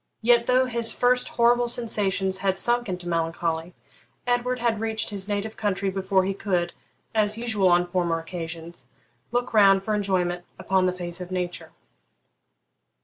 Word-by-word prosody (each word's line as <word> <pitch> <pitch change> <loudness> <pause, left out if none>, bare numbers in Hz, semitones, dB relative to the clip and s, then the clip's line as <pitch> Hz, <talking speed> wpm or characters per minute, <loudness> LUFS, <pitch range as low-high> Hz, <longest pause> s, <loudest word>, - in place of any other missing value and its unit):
Yet, 235 0 +5
though 255 +1 +3
his 235 -2 0
first 250 0 +2
horrible 240 +1 +3
sensations 200 -5 0
had 190 -1 0
sunk 240 +1 +1
into 180 -1 -5
melancholy, 165 0 -2 0.5
Edward 245 +1 0
had 235 -3 0
reached 220 -1 -1
his 200 -1 -4
native 210 +1 -3
country 200 -2 -1
before 190 0 +1
he 195 - -1
could, 180 -3 -1 0.4
as 215 -1 +2
usual 220 -5 +1
on 175 0 +4
former 175 -2 0
occasions, 165 -3 -7 0.4
look 245 0 -1
round 195 -2 +6
for 215 - -1
enjoyment 180 -4 0
upon 190 0 +1
the - - +2
face 175 -1 -6
of 180 - -6
nature. 180 -1 -4
195 Hz, 150 wpm, -25 LUFS, 180-225 Hz, 0.5 s, round